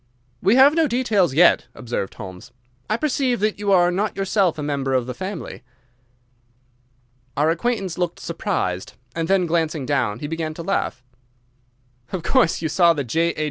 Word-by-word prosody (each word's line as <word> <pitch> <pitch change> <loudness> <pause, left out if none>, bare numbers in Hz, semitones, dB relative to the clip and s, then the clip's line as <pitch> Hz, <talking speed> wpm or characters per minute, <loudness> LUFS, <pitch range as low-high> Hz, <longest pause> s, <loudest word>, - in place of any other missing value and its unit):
"We 200 +5 +4
have 265 +2 +7
had 315 - -4
no 325 -2 +4
details 215 - +1
yet," 175 +3 +5
observed 120 -5 -4
Holmes. 95 +2 -10 0.4
"I 215 - +1
perceive 265 -3 0
that 215 -1 0
you 205 -1 0
are 175 -2 +5
not 200 +4 -2
yourself 195 -3 +1
a 150 - -4
member 140 -2 -1
of 125 -2 +1
the 125 - -5
family." 185 -3 -6 1.8
Our 150 +3 +3
acquaintance 190 -1 -2
looked 175 -1 -2
surprised, 105 - -3 0.2
and 165 -1 -1
then, 190 -1 +3
glancing 160 -4 -1
down, 125 -7 0
he 135 - -6
began 155 0 -4
to 170 - -7
laugh. 165 -8 -2 1.1
"Of 185 -3 -4
course 200 -7 +2
you - - +1
saw 170 +2 +4
the 145 -3 -2
'J.H. 165 +8 0
170 Hz, 170 wpm, -22 LUFS, 145-200 Hz, 1.8 s, have